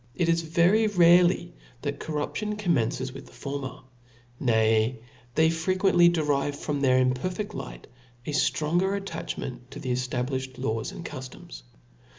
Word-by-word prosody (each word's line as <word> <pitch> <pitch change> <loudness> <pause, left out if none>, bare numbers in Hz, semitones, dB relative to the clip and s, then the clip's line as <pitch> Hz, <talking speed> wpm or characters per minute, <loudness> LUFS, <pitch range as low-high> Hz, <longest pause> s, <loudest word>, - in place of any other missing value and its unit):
It 175 - +1
is 165 0 +3
very 175 +7 +3
rare 175 -3 +6 0.5
that 145 -1 -3
corruption 185 +8 -3
commences 130 - 0
with 135 0 -10
the - - -16
former: 140 -2 -5 0.6
nay 110 0 +2 0.4
they 160 0 +4
frequently 175 +1 +3
derive 145 -4 0
from 145 0 -3
their 130 -2 +4
imperfedl 180 +11 -2
light 135 -1 -7 0.4
a - - -3
ftronger 175 +6 +1
attachment 130 -10 -6
to - - -9
the 130 - -3
eftablifhed 130 +1 -2
laws 115 -3 -2
and - - -9
cuftoms. 130 - -8
145 Hz, 135 wpm, -27 LUFS, 130-175 Hz, 0.6 s, rare